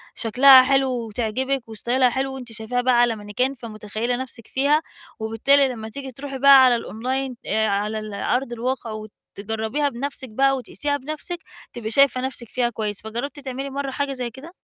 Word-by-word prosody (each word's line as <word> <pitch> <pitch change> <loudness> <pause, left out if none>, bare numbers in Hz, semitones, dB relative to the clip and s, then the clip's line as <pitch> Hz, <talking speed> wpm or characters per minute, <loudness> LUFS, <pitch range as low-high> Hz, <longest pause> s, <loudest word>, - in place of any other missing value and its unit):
شكلها 260 +4 +7
حلو 270 0 +2 0.2
وتعجبِك 245 +3 -2
وستايلها 245 +4 +1
حلو، 265 +2 -2
وأنتِ 250 -3 -8
شايفاها 225 +2 -2
بقى 245 -1 +4
على 240 -2 +3
مانيكان 220 +6 -2
فمُتخيلة 220 0 -4
نفسِك 245 -3 -7
فيها، 285 +4 +2 0.4
وبالتالي 250 +6 +3
لما 220 -3 -6
تيجي 270 +2 -7
تروحي 270 +2 -7
بقى 275 -1 +8
على 245 -2 +4
الonline 255 +3 -3
آآ 220 +1 +1
على 210 +2 -1
الأرض 235 +4 -2
الواقع، 240 0 -3
وتجربيها 220 +5 -4
بنفسِك 270 +1 -5
بقى، 270 +5 +2
وتقيسيها 285 +3 -3
بنفسِك، 310 +5 -5 0.4
تبقي 230 -2 -5
شايفة 255 +1 +4
نفسِك 255 -3 -4
فيها 245 -1 0
كويس، 210 -3 -3
فجربتِ 235 +7 -5
تعملي 270 0 -5
مرّة 275 0 -3
حاجة 280 0 -2
زي 250 -2 -4
كده؟ 270 +9 -12
250 Hz, 165 wpm, -23 LUFS, 220-270 Hz, 0.4 s, بقى